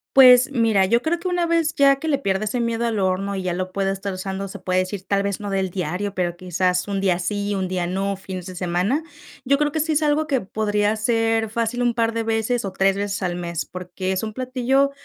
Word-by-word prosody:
Pues, 255 0 +8
mira, 225 -7 +3
yo 235 +3 +3
creo 330 +3 0
que 365 - -2
una 355 -1 +1
vez 330 -2 +1
ya 275 -1 +5
que 315 +4 -4
le 280 - +3
pierda 195 -5 0
ese 220 +4 -1
miedo 235 0 0
al 220 -3 -1
horno 195 +1 0
y 190 - -3
ya 180 - -1
lo 185 +1 -3
pueda 195 0 0
estar 195 0 -4
usando, 190 +1 -4
se 200 - -8
puede 185 0 0
decir, 185 +1 -3
tal 200 0 +1
vez 200 -1 -2
no 205 -1 -5
del 190 -1 0
diario, 180 +2 -3
pero 175 -3 -1
quizás 180 +1 -1
un 195 -1 -1
día 185 -3 +2
sí, 205 +3 -2
y 205 - 0
un 190 -1 -2
día 180 -2 -1
no, 195 +1 -1
fines 185 -2 -7
de 185 -1 -8
semana, 180 - 0 0.4
yo 280 +2 +3
creo 295 0 +1
que 315 - -2
sí 315 +1 +1
es 305 - +1
algo 305 +1 +2
que 270 -5 +1
podría 210 +1 0
hacer 225 0 +1
fácil 230 +2 -1
un 240 -1 +2
par 230 -1 +1
de 230 0 -1
veces 225 +1 0
o 190 - -4
3 195 0 +2
veces 200 -1 -2
al 175 -1 -1
mes, 170 -2 -3
porque 185 +1 -5
es 190 - -1
un 215 -1 -4
platillo 260 +3 +1
205 Hz, 255 wpm, -22 LUFS, 185-245 Hz, 0.4 s, Pues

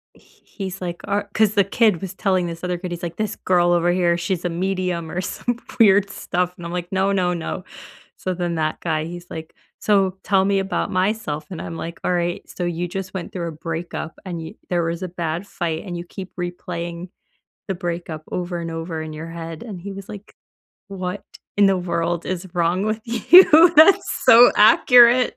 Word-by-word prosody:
H - - -25
he's 195 -1 -7
like 175 -1 -5
"Or" 205 0 -1
'cause 215 -1 +3
the 200 -2 +4
kid 210 -4 +2
was 190 -1 -6
telling 185 -3 +1
this 170 +1 -6
other 180 -1 -2
kid, 180 -1 -6
he's 175 +1 -6
like, 170 0 -5
"This 215 -1 -2
girl 175 -1 +2
over 175 0 +3
here, 175 -1 +2
she's 175 0 -2
a 175 - +1
medium," 180 -2 -2
or 180 - -2
some 240 +5 -3 0.2
weird 200 -2 +5
stuff, 180 -1 -2
and 170 - -8
I'm 170 - -6
like, 175 0 -4
"No, 190 +1 +2
no, 180 -2 +1
no," 175 +2 -5 0.5
so 185 -1 -3
then 175 -1 -2
that 155 -1 -1
guy, 155 -2 -1
he's 175 +1 -9
like, 160 0 -8 0.2
"So, 195 -2 +1
tell 195 -2 +3
me 200 0 +2
about 195 +1 -2
myself," 185 -6 -1
and 175 - -6
I'm 165 - -6
like, 165 +1 -7
"Alright, 175 -1 -1
so, 180 - -4
you 175 0 -2
just 190 0 -6
went 185 -3 -5
through 170 -2 -3
a - - -6
breakup 165 +1 -6
and 170 -3 -5
yo 160 - -8 0.2
there 175 -1 +1
was 165 +2 -3
a 185 - -3
bad 170 +1 -4
fight, 165 -3 -3
and 175 -3 -5
you 170 - -6
keep 190 +1 -9
replaying 175 0 -5 0.6
the 195 - -2
breakup 170 -3 -5
over 175 -1 -3
and 165 -1 -5
over 165 0 -4
in 155 -1 -6
your 160 +2 -7
head." 165 -1 -7
And 205 -6 -7
he 200 +1 -6
was 195 0 -9
like, 210 0 -10 0.5
"What 185 0 -5 0.3
in 205 - +6
the 190 -1 +2
world 170 -1 -2
is 185 0 -4
wrong 175 +2 +1
with 215 +1 -1
you? 325 - +7
That's 320 +6 +6
so 240 +2 +9
accurate." 240 +3 +6
180 Hz, 205 wpm, -21 LUFS, 170-195 Hz, 0.6 s, so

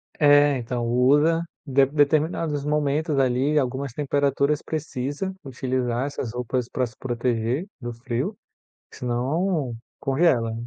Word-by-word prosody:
É, 145 -1 +5
então, 120 0 -3
usa. 145 +7 +3 0.2
De 135 -1 +4
determinados 150 +1 +1
momentos 150 0 0
ali, 135 +3 +2
algumas 135 0 -2
temperaturas 140 +1 +1
precisa 150 +3 -3
utilizar 130 -1 -2
essas 135 -5 -4
roupas 125 0 -2
pra 130 - 0
se 115 - -16
proteger 120 - -1
do 120 -1 -4
frio, 125 - -3 0.6
senão 130 +3 -1 0.2
congela. 135 -5 +2
135 Hz, 115 wpm, -24 LUFS, 125-150 Hz, 0.6 s, É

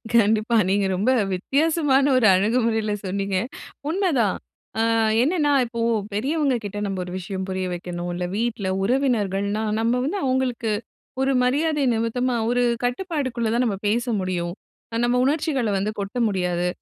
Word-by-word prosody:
கண்டிப்பா. 220 +1 +3
நீங்க 200 +1 +2
ரொம்ப 210 +8 +2 0.2
வித்தியாசமான 280 - +2
ஒரு 235 -4 +4
அணுகுமுறையில 220 +1 +1
சொன்னீங்க. 195 0 -1 0.5
உண்மைதான். 315 - +1 0.4
அ - - +3 0.4
என்னென்னா, 295 +1 +2
இப்போ 235 0 -6 0.3
பெரியவங்ககிட்ட 245 -4 -1
நம்ம 195 -2 -3
ஒரு 180 - -8
விஷயம் 190 +1 -4
புரிய 185 0 -2
வைக்கணும். 175 0 -5
இல்ல 180 +1 -3
வீட்ல 225 -4 -1 0.2
உறவினர்கள்ன்னா 210 -4 0 0.2
நம்ம 230 +1 +2
வந்து 320 +10 -1
அவுங்களுக்கு 255 -3 0 0.5
ஒரு 270 +1 +2
மரியாதை 295 +3 +1
நிமித்தமா 240 +2 0
ஒரு 245 0 +2 0.2
கட்டுப்பாட்டுக்குள்ள 255 -4 -1
தான் 240 +2 +2
நம்ம 205 -4 -1
பேச 235 +4 +1
முடியும். 175 -2 -2 0.4
அ - - -2
நம்ம 245 +1 +2
உணர்ச்சிகள 280 -5 0
வந்து 200 +2 -1
கொட்ட 200 +4 -4
முடியாது. 180 -3 0
230 Hz, 135 wpm, -23 LUFS, 195-260 Hz, 0.5 s, ஒரு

